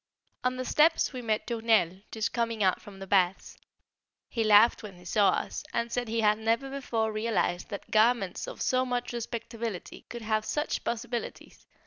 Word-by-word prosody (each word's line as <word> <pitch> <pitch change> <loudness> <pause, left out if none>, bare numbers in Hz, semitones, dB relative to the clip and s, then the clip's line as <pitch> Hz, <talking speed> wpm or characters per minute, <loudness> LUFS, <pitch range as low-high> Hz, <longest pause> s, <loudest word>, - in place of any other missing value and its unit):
On 250 0 +1
the 255 - -3
steps 310 +3 +3
we 255 - -5
met 220 -2 -1
de 240 - -3
Tournelle 220 -6 +2
just 220 -1 -2
coming 230 -3 0
out 185 -1 +2
from 200 -2 -12
the 195 - -7
baths; 190 -1 +1 0.7
he 230 - -1
laughed 215 +2 +6
when 210 -4 -9
he 180 0 -16
saw 200 +3 +3
us, - - -2
and 235 0 -1
said 245 0 -1
he 225 +1 0
had 210 0 +3
never 230 +5 0
before 230 -5 -1
realised 215 -5 -1
that 200 -2 -7
garments 215 -3 +2
of - - -5
so 255 0 +2
much 245 -1 -2
respectability 230 -3 -5
could 235 -1 -7
have 215 0 0
such 295 +7 -2
possibilities! 240 0 -5
225 Hz, 180 wpm, -29 LUFS, 210-240 Hz, 0.7 s, laughed